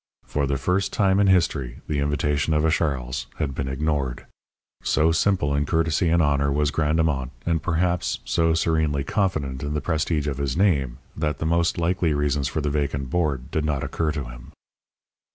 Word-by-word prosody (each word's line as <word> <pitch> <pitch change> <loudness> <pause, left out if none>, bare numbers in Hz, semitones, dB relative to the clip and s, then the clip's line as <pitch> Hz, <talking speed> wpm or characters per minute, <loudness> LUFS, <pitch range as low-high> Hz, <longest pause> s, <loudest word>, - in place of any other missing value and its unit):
For 70 -1 -1
the 70 0 0
first 90 +8 0
time 100 -2 +2
in 100 - +4
history 80 -9 +1
the 75 -2 -1
invitation 75 +1 0
of 75 +1 +2
a 80 - +3
Charles 65 -6 -1
had 75 -4 -2
been 65 0 -3
ignored. 70 -2 -2 0.6
So 80 +1 +2
simple 80 -3 +1
in 70 +1 +1
courtesy 80 +1 +1
and 85 0 +3
honour 70 -1 +2
was 75 0 +1
Grandemont, 75 -4 +1 0.2
and, 85 -2 +1
perhaps, 85 +1 0
so 80 -1 +2
serenely 80 -3 +1
confident 75 -7 -1
in 75 0 -3
the - - +1
prestige 75 0 -1
of 70 -2 -3
his 70 -1 -1
name, 70 -11 +2 0.2
that 75 -3 -1
the 80 - -3
most 85 +1 +1
likely 85 -2 +1
reasons 75 -1 0
for 80 - -2
the 75 0 -1
vacant 70 -3 -2
board 75 -7 -1
did 80 - 0
not 75 -3 -1
occur 80 -2 -1
to 75 -2 -3
him. - - -11
75 Hz, 185 wpm, -24 LUFS, 70-80 Hz, 0.6 s, in